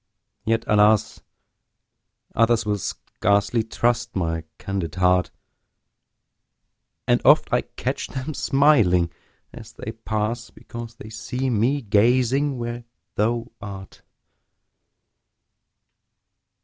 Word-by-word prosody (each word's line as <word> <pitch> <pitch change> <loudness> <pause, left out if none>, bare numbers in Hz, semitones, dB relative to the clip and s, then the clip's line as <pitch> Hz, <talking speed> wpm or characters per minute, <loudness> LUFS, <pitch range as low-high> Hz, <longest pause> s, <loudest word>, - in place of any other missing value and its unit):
yet, 115 +1 +1
alas! 105 0 +3 1.1
Others 115 0 +3
will 105 -1 0
scarcely 100 +2 0
trust 120 +1 -1
my 80 -3 -1
candid 90 -6 -4
heart; 90 0 +3 1.8
And - - +3
oft - - +5
I - - +4
catch - - -4
them 135 +4 -5
smiling 115 - +3 0.4
as - - -11
they 110 - -6
pass, 110 0 -3
Because 115 0 -9
they 110 -1 -11
see 125 +4 -3
me 125 +6 +1
gazing 125 +6 +2
where 120 0 -4 0.3
thou 115 +3 0
art. 95 -2 -9
110 Hz, 95 wpm, -23 LUFS, 100-120 Hz, 1.8 s, oft